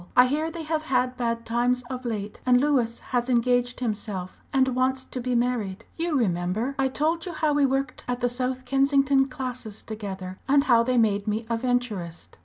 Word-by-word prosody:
I 250 - +9
hear 300 +5 0
they 330 0 -6
have 310 0 -1
had 255 -1 +1
bad 230 -1 -2
times 245 +2 +1
of 255 +1 -7
late, 210 -3 -4
and 250 -1 +5
Louis 255 -5 +1
has 245 0 -2
engaged 245 0 +2
himself, 205 -5 -4
and 265 -1 +3
wants 260 +1 0
to 255 - -5
be 250 0 -1
married. 230 -4 -1
You 330 -2 0
remember 195 +3 0
I 270 - +3
told 315 +6 0
you 350 - -4
how 310 -1 +1
we 285 -1 +4
worked 270 0 -2
at 245 0 -1
the 245 - +2
South 255 +1 -2
Kensington 275 0 +3
classes 250 -5 -6
together, 190 -4 -6
and 280 0 +5
how 240 -5 +5
they 250 +1 +1
made 205 -3 +2
me 215 +2 -1
a - - +3
Venturist? 225 -9 -3
250 Hz, 195 wpm, -26 LUFS, 230-270 Hz, -, I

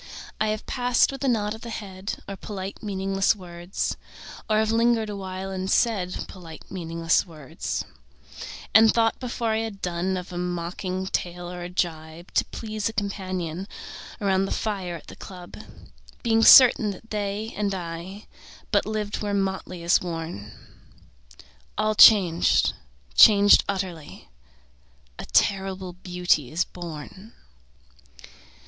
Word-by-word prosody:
I 215 - +1
have 215 0 -2
passed 245 0 +2
with 275 0 -7
a - - +1
nod 210 -4 +1
of 220 - -10
the 235 - -7
head 200 -3 -6
Or 195 - -5
polite 195 -1 -7
meaningless 195 -1 0
words, 175 -1 -4 0.5
Or 215 - +3
have 220 0 +2
lingered 230 -1 +2
awhile 190 -1 -5
and 190 0 -3
said 195 -7 +1
Polite 165 -4 -12
meaningless 165 -2 0
words, 155 -6 -5 0.9
And 220 0 +7
thought 225 -1 +1
before 240 -2 -3
I 220 - +1
had 220 -3 -5
done 180 +1 -2
Of 180 0 -7
a 175 - -3
mocking 180 +1 -3
tale 175 -1 -3
or 180 0 -7
a 175 - -5
gibe 165 -1 -4
To - - +2
please 215 -1 -4
a - - -8
companion 185 -4 -3 0.5
Around 195 -2 +1
the - - -5
fire 195 -5 -2
at 165 - -11
the - - -11
club, 180 -2 -11 0.7
Being 225 -2 +3
certain 235 -3 +8
that 205 +3 -9
they 210 +1 -3
and 205 -1 -1
I 175 +3 -7 0.5
But - - +2
lived 215 -1 -3
where 205 -1 -1
motley 190 -3 -3
is 170 +2 +4
worn: 165 - -6 1.3
All 215 0 +1
changed, 190 -6 +6 0.4
changed 205 - +7
utterly: 185 - -5 0.9
A - - -6
terrible 190 -2 0
beauty 180 -7 0
is 170 +3 +1
born. 175 +5 -9
190 Hz, 140 wpm, -25 LUFS, 175-215 Hz, 1.3 s, certain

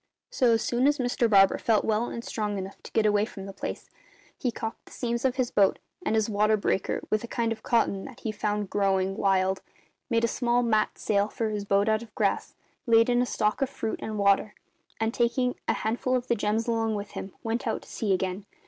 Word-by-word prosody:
"So 245 -3 +3
as 225 - +1
soon 245 +3 +2
as 290 0 +3
Mr 245 -2 +1
Barber 195 -2 +5
felt 220 -2 +2
well 220 +1 +1
and 235 -1 -6
strong 210 -3 -2
enough 190 0 -7
to - - -11
get 220 - +2
away 205 -1 +3
from 195 -3 -6
the 195 - -8
place, 195 - -6 0.5
he 250 - -1
caulked 225 -1 -6
the - - -15
seams 235 0 -2
of 260 -1 +2
his 255 -2 0
boat, 195 -2 +3 0.3
and 220 - 0
his 220 -1 +2
water 215 0 +2
breaker, 195 -2 -1
with 215 +1 +1
a - - -5
kind 230 -1 -1
of 220 -1 -4
cotton 220 -5 +1
that 260 -2 -11
he 225 - -2
found 210 -1 -2
growing 195 -1 +1
wild, 190 -1 +1 0.5
made 230 -1 +2
a 240 +1 +1
mat 220 -2 +1
sail 200 -1 +1
for 220 +1 -2
his 205 -1 -3
boat 200 +1 +2
out 220 0 +2
of 225 -3 -13
grass, 200 -2 0 0.3
laid 230 +1 +5
in 245 0 +3
a 250 - 0
stock 215 +3 0
of 270 - +1
fruit 225 - -4
and 215 -1 -4
water, 200 +1 +2 0.4
and, 225 +1 0
taking 245 +1 +1
a - - +3
handful 240 +3 -1
of 250 -1 -1
the 235 - +3
gems 215 +2 0
along 225 -1 0
with 205 0 -5
him, 190 - -7
went 230 +1 -2
out 225 - -2
to - - -17
sea 210 -3 -2
again. 190 +1 -1
220 Hz, 230 wpm, -27 LUFS, 205-235 Hz, 0.5 s, Barber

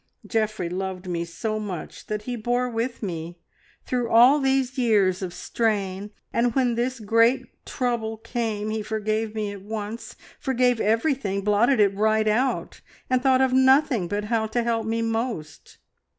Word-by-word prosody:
Geoffrey 215 -5 -1
loved 185 +1 -4
me 170 -1 -2
so 215 +6 -3
much 190 -6 -7
that 210 0 -3
he 245 +2 -4
bore 245 +2 0
with 235 0 -3
me, 170 -2 -5 0.5
through 245 -2 -1
all 245 +6 +6
these 265 -1 +1
years 205 -7 +2
of 185 -2 -3
strain, 200 0 -2 0.2
and 235 0 +1
when 255 -3 +2
this 245 +2 -1
great 230 +4 +3 0.2
trouble 235 -3 -2
came, 220 -2 -3
he 220 0 -2
forgave 215 +1 -2
me 210 -2 -2
at 200 -1 -9
once, 220 +2 -6 0.2
forgave 250 -3 +1
everything, 225 -3 +1
blotted 215 +5 +3
it 200 -2 +4
right 215 +1 +2
out, 245 +5 0 0.3
and 255 -1 +3
thought 260 -1 +4
of 260 -1 +2
nothing 260 - +4
but 205 +3 -2
how 220 0 0
to 235 +2 -1
help 230 -1 -1
me 230 +1 0
most. 225 -8 -4
220 Hz, 160 wpm, -24 LUFS, 205-245 Hz, 0.5 s, all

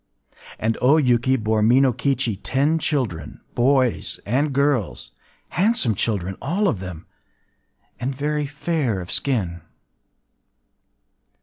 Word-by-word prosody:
And 110 +1 -1
O 140 +5 +5
Yuki 130 -2 +3
bore 110 -2 0
Minokichi 125 -1 +2
ten 145 +5 +1
children, 120 - -2
boys 130 -1 +1
and 140 +7 +1
girls,—handsome 140 - -1
children 95 -2 -2
all 185 +9 0
of 110 - 0
them, 90 -3 -8 0.9
and 130 +2 -3
very 150 +1 -1
fair 145 - -1
of 90 0 -7
skin. 95 -11 -1
130 Hz, 100 wpm, -22 LUFS, 105-145 Hz, 0.9 s, O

